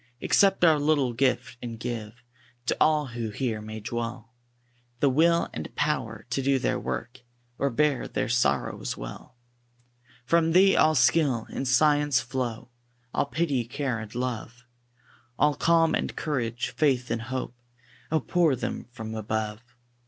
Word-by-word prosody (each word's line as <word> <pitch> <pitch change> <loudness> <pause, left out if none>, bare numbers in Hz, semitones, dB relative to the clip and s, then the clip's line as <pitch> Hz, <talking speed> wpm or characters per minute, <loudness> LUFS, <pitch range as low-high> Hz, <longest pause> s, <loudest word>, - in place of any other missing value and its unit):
Accept 195 +2 +3
our 155 -3 +5
little 145 -4 +2
gift, 125 -1 0
and 115 -2 -6
give 120 -1 -6 0.4
To - - +1
all 155 -1 +4
who 120 -2 -4
here 110 0 -2
may 110 0 -7
dwell, 115 +1 -5 0.7
The 140 - +3
will 170 +4 +3
and - - -7
power 120 -7 -1
to 135 - 0
do 135 0 +2
their - - 0
work, 65 -2 -5 0.4
Or 140 - +2
bear 145 +1 +1
their - - -2
sorrows 120 +1 0
well. - - -9 0.9
From 165 +3 +3
Thee 195 +2 +6
all 155 0 +4
skill 130 -3 +3
and 135 - -3
science 145 0 +4
flow; 125 -2 -4 0.4
All - - +1
pity, 145 -5 0
care, 130 -1 -3
and 110 0 -9
love, 125 0 -4 0.7
All 150 0 +3
calm 165 +2 +3
and - - -1
courage, 125 -6 -2
faith 130 -5 +1
and 115 -1 -1
hope, 130 +1 -4 0.6
Oh! 160 -2 +2
pour 165 -1 +2
them 125 - -4
from 110 -3 -7
above. 110 0 -3
125 Hz, 145 wpm, -27 LUFS, 115-150 Hz, 0.9 s, Thee